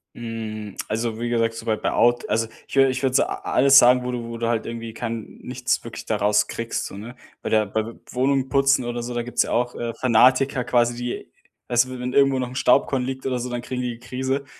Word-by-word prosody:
Hm. 110 -3 -6
Also, 110 +1 -2
wie 120 0 -2
gesagt, 115 -1 +1
soweit 110 -1 -2
bei - - 0
Out 120 0 +2
also 115 +2 +1 0.2
ich - - -7
wür 135 0 +6
ich 130 0 -3
würde 130 -1 +2
so - - +5
a - - -4 0.2
alles 135 +1 +7
sagen, 125 +1 +6
wo 125 - -3
du 120 -1 -4
wo 115 - -6
du 115 0 -2
halt 115 -2 -1
irgendwie 115 -1 -6
kein 115 0 -6
nichts - - -1
wirklich - - -8
da - - -1
raus 105 +1 +2
kriegst, 115 0 -3
so, - - -7
ne? 115 +4 -9 0.2
Bei - - -4
der 110 -1 +3
bei 110 +3 -3 0.2
Wohnungen 135 +1 +1
putzen 135 0 +3
oder 120 0 -3
so, 120 +1 -5
da 120 - -1
gibt's 120 0 +1
ja - - -4
auch, 120 0 0
äh, 115 -1 -4
Fanatiker 130 +3 +3
quasi, 120 0 +2
die 120 0 -5 0.4
weißt 120 +1 +3
du, 130 0 -7
wenn 125 +1 -4
irgendwo 135 -1 +4
noch 125 -1 -2
'n 125 - -10
Staubkorn 135 0 +3
liegt 130 +1 -5
oder 130 -2 -1
so, 125 +1 -4
dann 120 -1 -4
kriegen 125 0 -4
die 125 -1 -2
die 125 - -17
Krise. 130 +2 -2
120 Hz, 245 wpm, -23 LUFS, 115-130 Hz, 0.4 s, alles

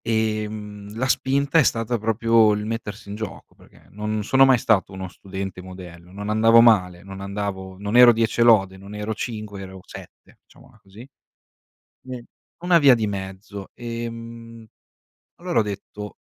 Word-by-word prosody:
Ehm, 105 -2 -3
la 130 - 0
spinta 140 +3 +2
è - - +6
stata 115 -1 0
proprio 115 0 +3
il 105 0 -3
mettersi 110 -2 -6
in 100 - -5
gioco, 110 -2 -8
perché - - -21
non 105 +1 -3
sono 135 +5 +5
mai 130 -1 +5
stato 100 -5 +1
uno 95 0 -6
studente 95 0 -7
modello, 90 -2 -12
non 105 +2 -6
andavo 115 +2 +5
male, 90 -7 +4
non 95 0 -9
andavo 100 -1 -5
non 100 +3 -4
ero 125 0 +9
10 115 0 0
e - - +7
lode, 95 -5 +4
non 100 +2 -11
ero 105 +1 -3
5, 105 -3 -6
ero 95 0 -9
7, - - -14
diciamola - - -21
così. 100 +3 -15
Mhmm, 125 - -12 1.6
una 170 - +7
via 140 -5 +7
di 110 -3 -1
mezzo; 95 0 -7
ehm, 115 -1 -8 0.8
allora 175 -9 0
ho - - +5
detto: 105 0 -7
105 Hz, 160 wpm, -23 LUFS, 100-115 Hz, 1.6 s, ero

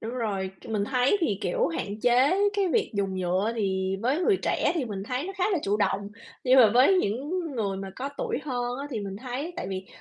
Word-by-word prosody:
Đúng 225 - -5
rồi, 200 -6 -2
c - - -13
mình 210 -2 -1
thấy 255 - +2
thì, 210 - 0
kiểu, 175 - +1
hạn 200 +6 -4
chế 250 - +4 0.2
cái 400 -3 +1
việc 440 +4 +1
dùng 195 -2 -1
nhựa 185 +4 0
thì 190 -2 0
với 265 +8 +1
người 390 +2 +4
trẻ - - +1
thì 315 - 0
mình 205 -5 -5
thấy 255 +8 -3
nó 390 - -5
khá 365 - +1
là 365 - +2
chủ 200 +1 +1
động, 200 -1 0 0.3
nhưng 260 0 +5
mà 220 -4 +7
với 260 +10 +6
những 285 - -1 0.2
người 200 -3 -1
mà 195 0 -6
có 270 +2 -3
tuổi 470 -2 -1
hơn 245 -3 -2
á 285 - -4
thì 230 -5 -3
mình 195 -1 -5
thấy 260 - -5
tại - - -4
vì 190 0 -5
230 Hz, 240 wpm, -27 LUFS, 195-275 Hz, 0.3 s, mà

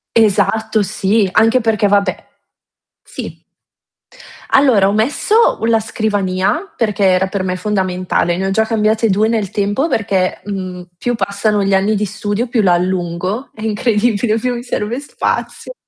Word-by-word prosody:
Esatto 220 0 +2
sì, 200 +1 +1
anche 225 +5 +3
perché 215 -2 +1
vabbè 200 -2 0 0.8
sì. - - -9 1.0
Allora, 245 -8 +4
ho 200 - +1
messo 290 - +2
la 225 -1 +3
scrivania, 210 - -1
perché 210 -3 -1
era 185 0 +3
per 190 -1 -3
me 185 -1 -2
fondamentale, 185 -3 -1
ne 190 - -1
ho 195 - -1
già 220 +2 +2
cambiate 220 0 +1
2 210 +3 +2
nel 220 -4 -1
tempo, 205 +9 0
perché, 195 - -1
mhmm, 185 -3 -6
più 245 +5 -1
passano 200 0 0
gli 195 0 +1
anni 200 +3 +2
di 210 - 0
studio, 210 +3 -3
più 235 -1 +1
la 185 -3 +3
allungo, 180 +5 -2
è 215 - -12
incredibile, 220 0 +1
più 250 +2 -1
mi 240 - -6
serve 240 0 -3
spazio. 295 +10 -4
210 Hz, 150 wpm, -16 LUFS, 190-225 Hz, 1.0 s, Allora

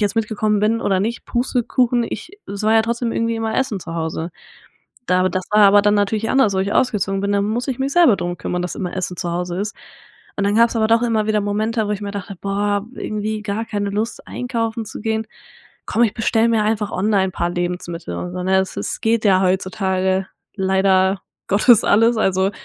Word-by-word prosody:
jetzt 205 0 0
mitgekommen 215 -1 0
bin 225 +2 +1
oder 190 -4 +1
nicht, 230 +4 -3
Pustekuchen. 245 -1 +1
Ich 335 - -6 0.2
soll 210 +2 -1
ja 225 - +5
trotzdem 235 +1 -2
irgendwie 230 0 0
immer 225 0 -2
essen 235 -8 -1
zu 165 0 -7
Hause. 160 +1 -3 0.8
Da 185 0 +2
w - - +3
das 185 +1 -2
war 210 - +5
aber 205 +1 +6
dann 205 0 +3
natürlich 210 +2 0
anders, 225 -7 +3
wo - - 0
ich 200 +2 -1
ausgezogen 195 -6 +1
bin, 200 +1 -1
dann 200 0 +1
muss 235 +6 -2
ich 255 - -2
mich 270 +1 -1
selber 330 - +5
drum 175 0 -4
kümmern, 180 0 -3
dass 180 - -4
immer 180 -1 -4
Essen 185 -1 -3
zu 175 -2 -2
Hause 180 +1 -3
ist. 210 +1 -4 0.6
Und - - +1
dann 200 +1 +1
gab's 235 +1 +4
aber 220 -1 +2
doch 230 +1 +4
immer 225 -3 +1
wieder 215 -1 +1
Momente, 215 +2 -1
wo 210 - 0
ich 205 - -3
mir 200 - -4
dachte: 200 0 -6
„Boah, 205 +1 -1
irgendwie 215 -1 -3
gar 210 +2 -3
keine 205 -1 -2
Lust, 215 +3 -3
einkaufen 230 -2 -3
zu - - -8
gehen. 220 0 -1 0.6
Komm! 235 - +1
Ich 215 - -1
bestell 225 0 +2
mir 225 -2 +2
einfach 210 -1 0
online 195 0 +2
'n - - -8
paar 170 0 -1
Lebensmittel 175 - -4
und 175 - -5
so“, 180 0 -4
ne? 190 +1 +2
Es 190 - -4
es - - -4
geht 225 0 +1
ja 190 -2 +4
heutzutage 190 0 0 0.3
leider 190 0 +2 0.3
Gottes 215 +3 +5
alles. 225 +3 +4
Also, 190 -1 +2
205 Hz, 215 wpm, -20 LUFS, 190-225 Hz, 0.8 s, aber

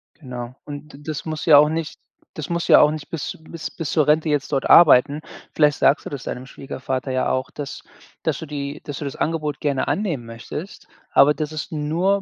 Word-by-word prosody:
Genau. 125 -4 -8
Und 145 +1 -9
d - - -11
das 155 -2 -5
muss 155 -2 -4
ja 155 -3 +8
auch 150 +1 +6
nicht 160 -1 -4 0.3
das 155 0 -6
musst 170 0 -1
ja - - +9
auch 150 - +5
nicht 155 -2 -6
bis 165 -3 -4
bis 165 -2 -6
bis 160 -3 -5
zur 155 - +3
Rente 155 +1 +3
jetzt 145 -1 0
dort 135 -2 0
arbeiten. 150 -2 +7 0.3
Vielleicht 150 -2 +4
sagst 140 - +3
du - - -4
das 140 -3 -6
deinem 125 +1 -5
Schwiegervater 130 -1 -5
ja 130 0 0
auch, 130 +1 -1
dass 145 -3 -7 0.4
dass - - 0
du - - -6
die 145 -1 -5
dass 145 -1 -6
du 150 - -5
das 140 - -5
Angebot 150 -2 -2
gerne 140 -3 -1
annehmen 170 - -1
möchtest, 115 - -8 0.2
aber 145 +2 +6
dass 155 0 -4
es 155 0 -5
nur 170 +6 +1
150 Hz, 215 wpm, -22 LUFS, 140-155 Hz, 0.4 s, ja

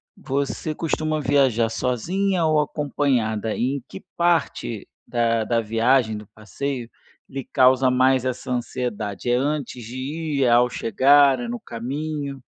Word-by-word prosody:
você 140 +3 -3
costuma 155 -1 -1
viajar 130 -5 +2
sozinha 170 - 0
ou 155 -1 +3
acompanhada 125 -8 -1
e 130 +4 0
em 135 - -9
que - - -9 0.2
parte 170 - 0 0.2
da 115 -2 +1
da 115 +1 +1
viagem, 115 +1 +2
do 105 - -10
passeio, 115 +5 -5 0.4
lhe 135 0 -5
causa 130 +1 +4
mais 130 0 +3
essa 130 0 -3
ansiedade? 120 -4 -3
É 120 - +3
antes 140 -2 -2
de 120 +3 -8
ir, 145 +1 -2
é 125 - +3
ao 120 +1 +5
chegar, 135 +4 +4
é 240 - -4
no 240 +1 -4
caminho? 140 - -5
130 Hz, 145 wpm, -23 LUFS, 115-145 Hz, 0.4 s, ao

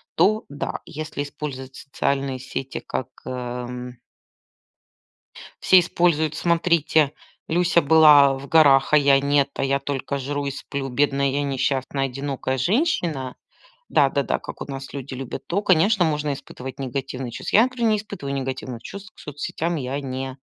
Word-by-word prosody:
то, 210 +6 +3
да. 145 - -4
Если 155 -1 -5
использовать 135 -2 -6
социальные 140 -1 -2
сети, 130 +1 -5
как, 130 - -4 0.2
эм 125 -1 -5 1.6
все 185 - +7
используют: 170 -3 +2
смотрите, 165 -3 +2 0.4
Люся 170 0 +3
была 145 -2 +7
в 140 +1 -9
горах, 145 -4 +5
а - - +7
я 140 -1 +4
нет, 140 0 +2
а - - -3
я 140 0 +1
только 140 0 -3
жру 145 +1 -3
и - - -1
сплю, 135 0 -5
бедная 140 +1 +1
я 145 +2 -1
несчастная 135 0 -1
одинокая 135 0 -3
женщина. 165 - 0 0.5
Да-да-да, 140 -1 +2
как - - -9
у - - -3
нас 135 0 -7
люди 140 -1 -6
любят 130 -1 -7
то, 195 +4 0
конечно, 185 +3 +4
можно 150 -2 0
испытывать 130 -1 -9
негативные 130 -1 -4
чувства. 120 - 0
Я, 220 - +8
например, 250 -3 0
не 215 - +3
испытываю 185 -10 -6
негативных 130 -3 -5
чувств, 200 +2 -9
к - - -19
соцсетям 155 +3 -3
я 135 +1 -3
не 130 -1 -5
140 Hz, 150 wpm, -23 LUFS, 135-155 Hz, 1.6 s, Я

